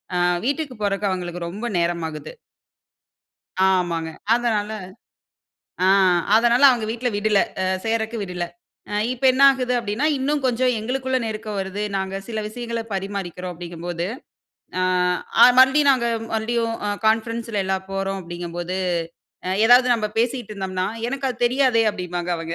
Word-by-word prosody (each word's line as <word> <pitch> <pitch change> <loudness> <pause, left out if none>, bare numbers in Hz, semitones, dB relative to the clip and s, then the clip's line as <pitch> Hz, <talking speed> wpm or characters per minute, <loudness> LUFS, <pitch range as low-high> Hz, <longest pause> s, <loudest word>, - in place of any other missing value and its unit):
அ - - +1 0.3
வீட்டுக்கு 285 -1 -2
போறக்கு 200 0 0
அவுங்களுக்கு 175 -2 -4
ரொம்ப 205 +7 -6
நேரம் 170 -1 0
ஆகுது. 155 -1 -8 1.4
ஆமாங்க. 170 -3 0 0.2
அதனால 220 -3 0 1.2
ஆ - - +4 0.5
அதனால 240 +3 +4
அவங்க 240 -4 +1
வீட்ல 240 +2 -1
விடல. 205 0 +2 0.2
அ - - 0 0.2
சேர்றதுக்கு 225 0 -1
விடல. 180 -3 -3 0.5
அ - - -4 0.2
இப்ப 255 +1 -12
என்ன 260 +2 -1
ஆகுது 255 -2 0
அப்பிடின்னா, 230 +4 -1
இன்னும் 285 +2 0
கொஞ்சம் 250 0 +2
எங்களுக்குள்ள 260 +3 -1
நெருக்கம் 215 -1 -4
வருது. 190 +1 -4 0.2
நாங்க 190 0 -3
சில 220 -2 -3
விஷயங்கள 235 +1 -4
பரிமாறிக்கிறோம் 190 -2 -4
அப்பிடிங்கும்போது, 175 0 -5 0.7
அ - - +1 0.6
அ - - +12
மறுபடியும் 275 +2 +6
நாங்க 245 -3 0 0.3
மறுபடியும் 230 +1 -1
அ - - 0 0.2
கான்ஃபரன்ஸ்ல 225 -1 0
எல்லாம் 190 0 -2
போறோம் 195 0 -2
அப்பிடிங்கும்போது, 175 +1 -5 0.7
அ - - -1 0.2
எதாவது 245 +2 +6
நம்ம 215 -2 -2
பேசிக்கிட்டு 240 -2 -1
இருந்தம்னா, 185 -1 -2 0.2
"எனக்கு 275 +1 -2
அது 245 -1 -3
தெரியாதே!" 250 -2 +3
அப்பிடிம்பாங்க 180 -2 -4
அவங்க. 165 0 -5
215 Hz, 140 wpm, -22 LUFS, 185-240 Hz, 1.4 s, அ